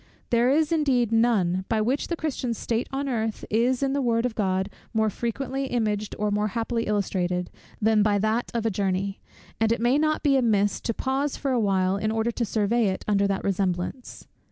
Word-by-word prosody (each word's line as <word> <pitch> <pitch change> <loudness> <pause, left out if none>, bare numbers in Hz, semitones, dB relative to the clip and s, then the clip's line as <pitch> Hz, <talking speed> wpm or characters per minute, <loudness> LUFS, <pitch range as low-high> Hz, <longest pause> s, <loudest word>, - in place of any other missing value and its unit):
There 240 +1 +4
is 305 +3 +2
indeed 265 -8 +2
none, 210 -6 +2
by 220 - +1
which 250 +6 0
the 340 - -1
Christian's 265 -8 -3
state 230 +1 -2
on 275 +1 -2
earth 225 -4 -2
is 245 +4 +2
in 270 0 +1
the 280 - 0
word 235 -1 +1
of 250 - -1
God 190 -3 0 0.3
more 220 -1 +2
frequently 265 +5 -3
imaged, 215 -4 -1
or 210 0 0
more 210 +1 +1
happily 230 0 -1
illustrated, 180 -3 -1 0.3
than 220 0 +3
by 205 -1 +3
that 215 +4 0
of 230 -1 -1
a 225 - +2
journey: 195 0 -1 0.4
and 225 0 +2
it 230 - +1
may 245 +5 +3
not 310 0 +1
be 280 -2 +4
amiss 210 -5 +2
to 230 - -2
pause 270 +2 -1
for 275 - -2
a 250 - +2
while 190 -2 +1
in 215 +2 -1
order 225 +1 0
to 235 0 -2
survey 220 +2 +1
it 190 - -3
under 200 -1 +2
that 195 -1 -2
resemblance. 190 +5 -2
225 Hz, 205 wpm, -25 LUFS, 205-250 Hz, 0.4 s, There